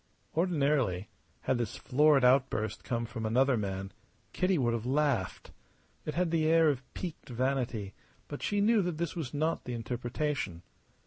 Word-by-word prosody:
Ordinarily 140 - +1 0.3
had 130 - 0
this 115 -1 -2
florid 140 +1 +4
outburst 125 -5 +2
come 115 -1 -2
from 115 0 -6
another 130 +4 +3
man 95 -2 -3 0.4
Kitty 185 0 +2
would 120 -4 +1
have 115 +1 -3
laughed. 135 -9 0 0.6
It 150 - -3
had 175 -1 +1
the 160 -2 +2
air 165 0 +5
of 135 -4 -1
piqued 170 -5 -6
vanity; 125 -5 -1 0.3
but 145 - -7
she 205 -1 0
knew 220 +1 +4
that 175 -4 -2
this 170 0 -2
was 155 -8 -4
not 155 +3 -1
the 125 - -4
interpretation. 120 - -3
135 Hz, 155 wpm, -31 LUFS, 115-155 Hz, 0.6 s, air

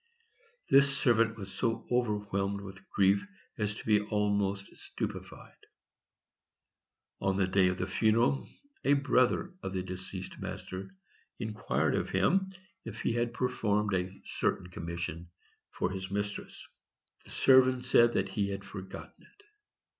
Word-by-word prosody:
This 140 0 +6
servant 115 -3 +3
was 95 -2 -7
so 115 -2 -1
overwhelmed 105 -4 0
with 95 0 -11
grief 100 0 +3 0.4
as 105 -1 -1
to - - -9
be 105 -2 +4
almost 100 -1 -1
stupefied. - - -7 1.5
On 95 0 0
the 100 - +3
day 95 0 +3
of 90 0 0
the 90 - -1
funeral 110 +6 +2 0.3
a 140 - +4
brother 140 +5 +2
of 95 - -5
his 90 - -1
deceased 95 0 -6
master 95 +1 -6 0.5
inquired 105 -1 -1
of - - -1
him 190 - +2 0.3
if - - -7
he - - +1
had 120 0 0
performed 105 -5 0
a 90 0 0 0.2
certain 90 0 -1
commission 85 0 -5 0.4
for 90 - -2
his 95 0 -5
mistress. 105 +1 -4 0.6
The - - -14
servant 130 -1 +5
said 120 -2 +5
that 95 0 0
he 100 0 -1
had 100 0 -4
forgotten 95 -2 -8
it. 415 - -23
100 Hz, 135 wpm, -31 LUFS, 95-120 Hz, 1.5 s, This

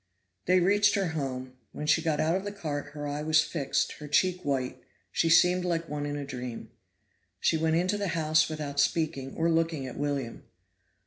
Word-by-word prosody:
They 185 +1 +5
reached 205 +3 +4
her 195 -4 0
home; 130 -4 -4 0.2
when 150 - -5
she 155 +1 +3
got 160 -2 0
out 160 +2 +2
of 190 - -2
the 205 - -4
cart 150 -7 -5
her 145 -1 -5
eye 145 +1 -3
was 155 0 +4
fixed, 150 -3 -1
her 150 - -7
cheek 180 +4 +2
white, 135 -3 -2 0.3
she 165 - +1
seemed 180 +2 +5
like 170 -2 -1
one 145 -1 -3
in 145 - -3
a 145 - -4
dream. 125 -4 -7 0.7
She - - +2
went 160 0 +1
into 185 +5 +1
the 200 - -1
house 155 0 +3
without 150 -2 -4
speaking 145 -3 0
or 165 - +1
looking 165 -4 +1
at 130 - -7
William. 140 -5 -3
155 Hz, 195 wpm, -28 LUFS, 145-170 Hz, 0.7 s, They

